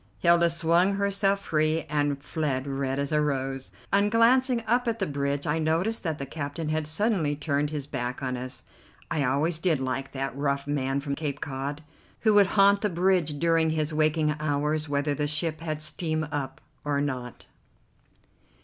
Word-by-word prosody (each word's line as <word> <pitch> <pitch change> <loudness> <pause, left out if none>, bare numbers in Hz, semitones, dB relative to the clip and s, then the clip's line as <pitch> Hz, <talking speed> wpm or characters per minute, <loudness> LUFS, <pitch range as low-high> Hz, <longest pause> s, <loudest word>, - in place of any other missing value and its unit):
Hilda 170 +5 +4
swung 170 +4 +2
herself 200 0 +1
free 155 +1 +1
and 145 -1 -1
fled, 145 -4 -2
red 135 -1 -2
as 140 0 -2
a 150 0 +3
rose. 135 -2 -2 0.2
On 200 +1 +4
glancing 240 +2 +4
up 240 +2 +1
at 230 -1 0
the 195 - 0
bridge 140 -2 -2
I 155 +2 0
noticed 165 +8 0
that 160 -4 -2
the 140 - -4
captain 145 +2 -4
had 155 -1 -1
suddenly 165 -3 0
turned 145 0 -1
his 145 -2 -4
back 125 -1 -4
on 130 -1 -1
us. 125 +1 -5 0.5
I 150 - +1
always 150 +5 +1
did 165 -4 +1
like 130 +1 -3
that 135 -1 -3
rough 140 0 -1
man 140 -1 -1
from 140 -1 -3
Cape 145 -1 -3
Cod, 140 +2 -4 0.4
who 220 -2 +4
would 205 -2 +6
haunt 200 0 +6
the 210 - +1
bridge 175 -4 +1
during 165 +1 +2
his 155 -1 -1
waking 155 0 +2
hours 150 +1 -1
whether 145 0 0
the 145 +1 -1
ship 155 +1 -1
had 155 -2 -3
steam 155 -1 -2
up 145 -3 -4 0.2
or 145 -1 0
not. 130 -4 -4
150 Hz, 175 wpm, -27 LUFS, 140-170 Hz, 0.5 s, would